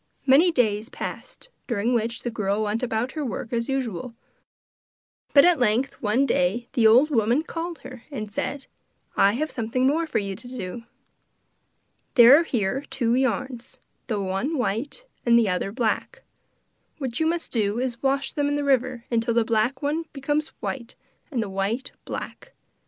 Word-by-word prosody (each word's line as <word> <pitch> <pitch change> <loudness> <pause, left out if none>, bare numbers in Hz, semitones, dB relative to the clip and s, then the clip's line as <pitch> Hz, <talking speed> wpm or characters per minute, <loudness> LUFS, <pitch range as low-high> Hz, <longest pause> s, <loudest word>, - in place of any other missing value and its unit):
Many 290 +7 +6
days 220 -5 +1
passed - - -7 0.2
during 235 0 0
which 230 +1 -1
the 240 - -2
girl 210 -1 -1
went 215 +2 -1
about 240 0 -1
her 305 0 -4
work 230 -1 -5
as 230 +1 -1
usual, 250 -3 -3 1.2
but 280 +1 +7
at 350 -4 +4
length 245 +3 +1
one 230 +5 +2
day 230 +1 +1
the 225 -3 +5
old 255 +8 +6
woman 235 +4 +2
called 335 0 -5
her 255 -2 -9
and 215 -7 -6
said: 275 +6 -3 0.5
'I 200 +1 +4
have 300 +5 -2
something 240 +2 -1
more 320 +5 +2
for - - -1
you 195 -2 -2
to 240 +5 -12
do. 235 -2 -6 1.3
There 245 +1 +9
are 325 - +4
here 240 -3 -1
two 235 -3 0
yarns, 250 -1 -1 0.3
the 215 -5 -1
one 195 +11 -1
white, 250 - -2 0.2
the 235 -2 +4
other 180 +2 -1
black. 230 -1 -2 0.7
What 255 -5 -4
you 320 - +2
must 335 0 -2
do 210 -2 0
is 255 -1 -1
to 235 - -22
wash 275 0 0
them 290 -1 0
in 290 - 0
the 290 - -1
river 255 -3 +1
till 230 0 -1
the 235 -1 +3
black 230 +5 0
one 310 +3 -1
becomes 295 +2 -1
white 245 -2 -5 0.3
and 250 -7 -1
the - - -5
white 195 +6 -2
black. - - -7
245 Hz, 170 wpm, -25 LUFS, 220-275 Hz, 1.3 s, There